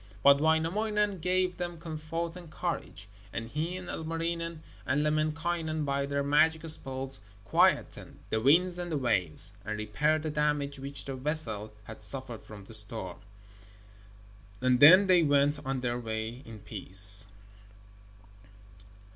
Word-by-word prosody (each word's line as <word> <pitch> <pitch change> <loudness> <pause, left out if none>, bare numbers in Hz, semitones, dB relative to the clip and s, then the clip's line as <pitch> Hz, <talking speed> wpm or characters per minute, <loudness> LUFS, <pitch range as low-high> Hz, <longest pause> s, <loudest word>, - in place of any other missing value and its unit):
But 140 0 +6
Wainamoinen 195 +6 +1
gave 180 +1 0
them 175 -1 -4
comfort 165 +1 -5
and 175 -3 -10
courage, 155 - -5 0.2
and 115 0 -5
he 160 +8 -3
and 185 -1 -9
Ilmarinen 165 0 -4 0.2
and 145 +3 0
Lemminkainen 155 +1 -1
by 140 0 -1
their 140 0 -1
magic 160 +3 +2
spells 135 -4 -1 0.2
quietened - - +1
the 110 - +1
winds 175 +7 +3
and 175 -1 -5
the 155 - 0
waves, 95 - +1
and 110 +1 -4
repaired 150 +9 0
the 155 - -2
damage 150 -2 -1
which 140 0 -5
the 135 - -5
vessel 130 -7 -1
had 110 +1 -11
suffered 130 -4 -6
from 105 -2 -12
the 115 - -10
storm. 110 +1 +1 1.4
And 125 0 +2
then 185 +8 +9
they 185 -2 +5
went 145 -1 +2
on 135 -1 -3
their 120 -1 -1
way 110 +1 -3
in 110 -2 -11
peace. 100 0 +1
150 Hz, 140 wpm, -29 LUFS, 120-165 Hz, 1.4 s, then